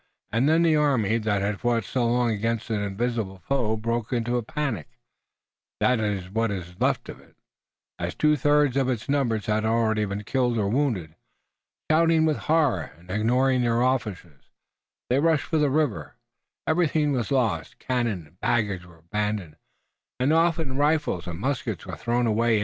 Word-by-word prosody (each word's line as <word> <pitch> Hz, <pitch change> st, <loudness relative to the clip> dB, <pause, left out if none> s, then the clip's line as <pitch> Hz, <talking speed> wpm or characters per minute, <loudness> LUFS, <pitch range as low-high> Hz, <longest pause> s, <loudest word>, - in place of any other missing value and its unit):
Then 145 Hz, +9 st, +3 dB
the 160 Hz, -2 st, +4 dB
army 120 Hz, -8 st, +2 dB
that 105 Hz, -3 st, 0 dB
had 100 Hz, 0 st, -1 dB
fought 120 Hz, -2 st, +1 dB
so 120 Hz, +4 st, -1 dB
long 120 Hz, 0 st, +2 dB
against 115 Hz, +1 st, -2 dB
an 105 Hz, -2 st, 0 dB
invisible 100 Hz, -1 st, -2 dB
foe 110 Hz, 0 st, -1 dB
broke 115 Hz, +2 st, -2 dB
into 120 Hz, 0 st, 0 dB
a 120 Hz, -, +1 dB
panic, 120 Hz, -, -3 dB, 0.9 s
that 125 Hz, -2 st, +3 dB
is 100 Hz, -4 st, -2 dB
what 115 Hz, +4 st, 0 dB
was 90 Hz, -3 st, -5 dB
left -, -, +1 dB
of -, -, -9 dB
it, -, -, -22 dB, 0.6 s
as -, -, -3 dB
two 150 Hz, 0 st, +3 dB
thirds 145 Hz, -1 st, +3 dB
of 135 Hz, -1 st, +2 dB
its 120 Hz, -4 st, -2 dB
numbers 120 Hz, -7 st, 0 dB
had 110 Hz, 0 st, 0 dB
already 110 Hz, -1 st, +1 dB
been 100 Hz, +1 st, -4 dB
killed 120 Hz, +1 st, 0 dB
or 105 Hz, -2 st, +1 dB
wounded. 110 Hz, -, 0 dB, 0.8 s
Shouting 165 Hz, 0 st, +4 dB
with 155 Hz, -2 st, +1 dB
horror 150 Hz, -, +2 dB
and 90 Hz, +2 st, -13 dB
ignoring 125 Hz, +5 st, +2 dB
their 120 Hz, 0 st, +2 dB
officers, 105 Hz, -, -2 dB, 0.6 s
they 130 Hz, -, +4 dB
rushed 160 Hz, 0 st, +2 dB
for 160 Hz, -, 0 dB
the 150 Hz, -1 st, +3 dB
river. 145 Hz, -4 st, -1 dB, 0.5 s
Everything 155 Hz, -2 st, +2 dB
was 125 Hz, -4 st, -1 dB
lost, 115 Hz, -, 0 dB
cannon 120 Hz, -9 st, -2 dB
and 85 Hz, +5 st, -24 dB
baggage 100 Hz, -5 st, 0 dB
were 85 Hz, -1 st, -17 dB
abandoned, 105 Hz, 0 st, -3 dB, 0.6 s
and 135 Hz, +5 st, +2 dB
often 160 Hz, -4 st, +1 dB
rifles 145 Hz, -, +1 dB
and 85 Hz, -2 st, -5 dB
muskets 115 Hz, -6 st, -2 dB
were -, -, -6 dB
thrown 120 Hz, +1 st, 0 dB
away. 115 Hz, 0 st, +2 dB
115 Hz, 165 wpm, -25 LUFS, 105-140 Hz, 0.9 s, the